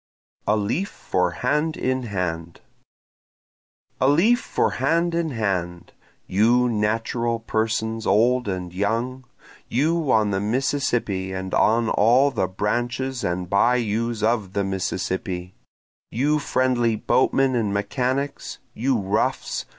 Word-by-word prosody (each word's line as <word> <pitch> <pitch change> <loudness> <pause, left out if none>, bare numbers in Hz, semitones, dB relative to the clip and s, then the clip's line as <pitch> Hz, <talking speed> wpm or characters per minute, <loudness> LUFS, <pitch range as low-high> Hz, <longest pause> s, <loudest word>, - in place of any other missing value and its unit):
A 105 - +3
Leaf 115 - -1
for 90 -1 -1
Hand 150 - -1
in 130 0 -1
Hand 85 -7 -4 1.4
A 130 - +3
leaf 195 - +4
for - - 0
hand 165 +5 +2
in 165 -1 0
hand; 90 - -3 0.3
You 120 +6 +3
natural 115 +1 -1
persons 110 0 -2
old 125 +3 +3
and 90 -2 -4
young! 115 +7 -2 0.4
You 155 +3 +1
on 105 -2 +3
the 95 - 0
Mississippi 115 -5 -1
and 95 0 -5
on 115 +1 +3
all 125 +7 +4
the 95 - 0
branches 120 +7 -2
and 90 +1 -2
bayous 115 +2 +1
of 110 -4 0
the 100 - 0
Mississippi! 95 -1 -3 0.6
You 145 +6 +1
friendly 125 -4 +1
boatmen 130 +4 +2
and 115 -4 0
mechanics! 130 +7 -2 0.2
you 130 +2 0
roughs! 100 +1 -1
115 Hz, 120 wpm, -23 LUFS, 100-130 Hz, 1.4 s, leaf